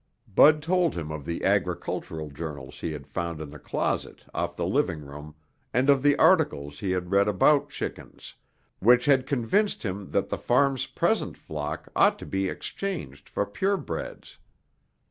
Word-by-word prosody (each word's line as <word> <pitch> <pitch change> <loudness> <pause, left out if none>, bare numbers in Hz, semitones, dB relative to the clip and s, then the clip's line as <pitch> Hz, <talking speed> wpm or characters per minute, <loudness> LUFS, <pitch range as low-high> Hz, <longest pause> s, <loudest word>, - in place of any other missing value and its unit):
Bud 150 +7 +6
told 175 0 +2
him 80 -2 -4
of 75 -2 -6
the 85 - -4
agricultural 80 -2 -1
journals 70 -3 -7
he 80 - -3
had 75 -3 -7
found 85 +2 -4
in 75 -2 -7
the 75 - -10
closet - - -3
off - - -2
the - - -2
living 85 -4 0
room 75 +2 -10 0.4
and 130 +3 +5
of 135 -2 +3
the 145 +1 +4
articles 70 0 +3
he 100 - -3
had 90 0 -2
read 100 +1 +4
about 145 +8 +3
chickens, - - -7 0.5
which 120 +3 +5
had 135 -2 +3
convinced 145 - +1
him 95 -2 -4
that - - 0
the - - -3
farm's 135 +1 +2
present - - 0
flock 75 0 -5
ought - - +4
to - - -9
be 95 0 -1
exchanged 170 - -5
for 100 - -1
purebreds. 190 - -3
95 Hz, 165 wpm, -27 LUFS, -, 0.5 s, Bud